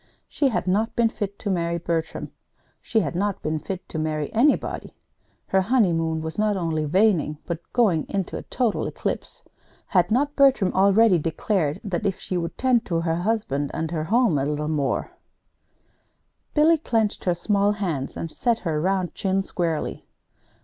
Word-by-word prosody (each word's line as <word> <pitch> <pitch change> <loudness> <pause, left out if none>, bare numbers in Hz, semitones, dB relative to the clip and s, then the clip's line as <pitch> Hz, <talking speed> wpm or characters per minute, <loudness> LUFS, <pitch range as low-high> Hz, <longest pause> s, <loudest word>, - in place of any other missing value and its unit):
She 285 - +1
had 235 - -1
not 205 +5 0
been 235 -1 +3
fit 200 -2 -5
to 205 - -3
marry 170 -2 0
Bertram. 165 -1 -3 0.5
She 220 - +1
had 145 -7 -2
not 200 +2 -1
been 155 0 -1
fit 185 +3 -6
to 160 - -4
marry 155 -1 -2
anybody. 260 +6 +1 0.5
Her 190 - +3
honeymoon 170 -8 +1
was 160 +5 -5
not 210 -1 +2
only 160 -3 -1
waning, 175 -4 +2
but 170 -1 -6
going 200 -10 +2
into 195 -3 -2
a - - -4
total 240 -5 -1
eclipse. - - -4 0.4
Had 180 -2 +2
not 280 +6 +1
Bertram 270 -9 +4
already 200 0 +5
declared 165 0 -1
that 200 0 -1
if 195 - -1
she 185 - -4
would 170 -1 -3
tend 250 -3 +3
to 165 -3 0
her 165 -1 0
husband 175 -8 -1
and 160 0 -2
her 155 -2 -2
home 220 - +3
a 135 - 0
little 150 0 -2
more 150 -3 -1 1.4
Billy 315 +2 +5
clenched 225 -7 0
her 180 -2 +2
small 200 +3 +2
hands 170 -10 -3
and 165 - -4
set 235 +5 +1
her 155 -2 0
round 185 0 0
chin 195 0 0
squarely. 170 -4 -3
185 Hz, 170 wpm, -24 LUFS, 160-215 Hz, 1.4 s, already